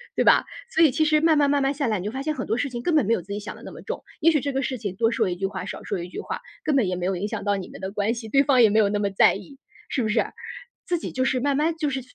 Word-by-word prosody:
对 - - +2
吧？ - - +5 0.2
所 325 - +1
以 315 -4 +6
其 310 - +1
实 305 0 +4
慢 320 0 +4
慢， 290 -1 +3
慢 285 -1 +2
慢 270 +1 +1
下 280 -2 -1
来， 215 -3 0
你 180 - -6
就 210 - -2
发 265 +3 -4
现 305 +2 -1
很 - - -5
多 220 - +1
事 280 +2 -1
情 240 -2 -5
根 325 +6 +1
本 300 - +4
没 225 - +2
有 210 - 0
自 195 +4 -7
己 205 - -3
想 210 - -7
得 - - -14
那 - - -8
么 - - -11
重。 - - -5 0.2
也 330 +1 +6
许 305 - +2
这 280 +1 -3
个 270 - 0
事 260 -1 -2
情 205 -5 -5
多 225 +3 +2
说 210 - +1
一 175 - -2
句 195 +2 -3
话， 190 -1 -4
少 - - -7
说 200 - -3
一 175 - -6
句 180 - -6
话， - - -5 0.2
根 295 -2 +2
本 235 -7 +2
也 180 - -1
没 180 0 -3
有 190 0 0
影 200 +4 -2
响 210 -2 -5
到 205 0 +1
你 190 - -6
们 - - -11
的 190 0 -4
关 205 +2 0
系， 230 -2 -7
对 275 +4 +4
方 270 -3 +4
也 220 - +6
没 215 +2 +3
有 210 - +4
那 205 +1 -1
么 200 -1 0
在 195 - +4
意， 205 +8 -10 0.3
是 265 - -1
不 225 - 0
是？ 215 - +2 0.6
自 355 - 0
己 - - -6
就 260 0 0
是 260 - +1
慢 280 +1 +1
慢 310 +4 +1
就 305 -2 0
是 265 -1 -3
240 Hz, 395 characters per minute, -24 LUFS, 200-285 Hz, 0.6 s, 以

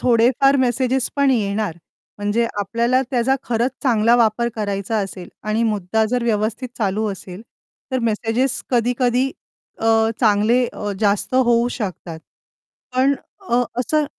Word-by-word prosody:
थोडेफार 250 +3 +4
मेसेजेस 255 0 +1
पण 280 -1 +3
येणार 205 -6 0 0.4
म्हणजे 205 +3 0
आपल्याला 235 +5 +1
त्याचा 255 +1 +2
खरंच 240 +2 0
चांगला 230 -3 +3
वापर 235 0 +2
करायचा 205 0 -2
असेल 190 -3 -5 0.2
आणि 215 +2 +1
मुद्दा 220 0 0
जर 245 -1 0
व्यवस्थित 225 +2 -1
चालू 210 0 0
असेल 190 +1 -10 0.5
तर 260 - 0
मेसेजेस 225 +4 0
कधी-कधी 245 +1 +1 0.5
अ, 225 - -2 0.3
चांगले 225 +3 +3
अ, 205 -1 -4
जास्त 205 +4 +1
होऊ 240 -2 +3
शकतात. 180 -7 -5 0.8
पण 270 +2 +4 0.3
अ, - - -5
अ 245 - +4 0.2
असं 305 +5 +1
230 Hz, 130 wpm, -20 LUFS, 210-250 Hz, 0.8 s, थोडेफार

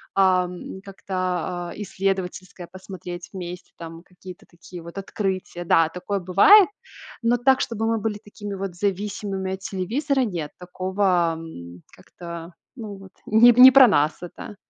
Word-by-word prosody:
а, 185 -2 +4
м, 180 +1 -9
как-то, 195 0 -10 0.6
а, - - -8
исследовательское 190 -2 -4
посмотреть 180 -2 -9
вместе, 180 -1 -8
там 165 0 -10
какие-то 180 0 -13
такие 175 0 -12
вот 170 +3 -8
открытия. 190 -3 -4
Да, 165 -1 +4
такое 190 +4 -4
бывает, 200 - +6 0.5
но 235 +1 +3
так, 265 +2 +3
чтобы 225 -1 -2
мы 225 0 0
были 210 -1 -3
такими 205 0 -8
вот 195 -2 -5
зависимыми 195 0 -3
от 190 - -17
телевизора, 245 - -1
нет, 170 -8 -5
такого, 180 -1 0
м, 85 - -10 0.2
как-то 170 0 -10 0.3
ну, 210 -2 -7
вот 195 -1 -14
не 225 +3 +6
не 250 +2 +9
про 265 -1 +8
нас 150 -6 +2
это. 180 +3 -9
190 Hz, 145 wpm, -23 LUFS, 175-205 Hz, 0.6 s, не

